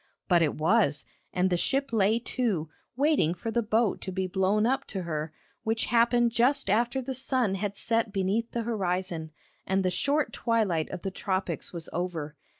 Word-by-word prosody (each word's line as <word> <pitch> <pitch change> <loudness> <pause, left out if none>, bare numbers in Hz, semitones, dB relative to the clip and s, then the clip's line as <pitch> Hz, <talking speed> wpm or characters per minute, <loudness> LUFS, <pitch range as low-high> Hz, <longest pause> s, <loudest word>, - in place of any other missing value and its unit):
But 175 -2 +4
it 155 -3 +1
was, 160 -2 +2 0.3
and 185 +1 +1
the 175 - +3
ship 275 +6 0
lay 215 +1 +3
to, 225 -9 -1 0.3
waiting 275 - +2
for 225 +6 -4
the 235 - +1
boat 220 -1 +1
to 190 - -5
be 190 0 -1
blown 190 +3 +1
up 265 +3 +1
to 190 -3 -5
her, 155 -2 -3 0.3
which 225 +1 0
happened 240 0 +4
just 245 -1 +3
after 240 +5 +1
the 265 +2 -3
sun 255 -5 0
had 200 +1 -3
set 225 -2 +1
beneath 200 +4 0
the 235 - -3
horizon, 185 -7 -2 0.4
and 190 0 +1
the 185 - +2
short 285 +9 0
twilight 210 -9 0
of - - -7
the 195 - -2
tropics 190 0 -2
was 170 -2 -6
over. 165 -4 -3
205 Hz, 180 wpm, -28 LUFS, 180-235 Hz, 0.4 s, But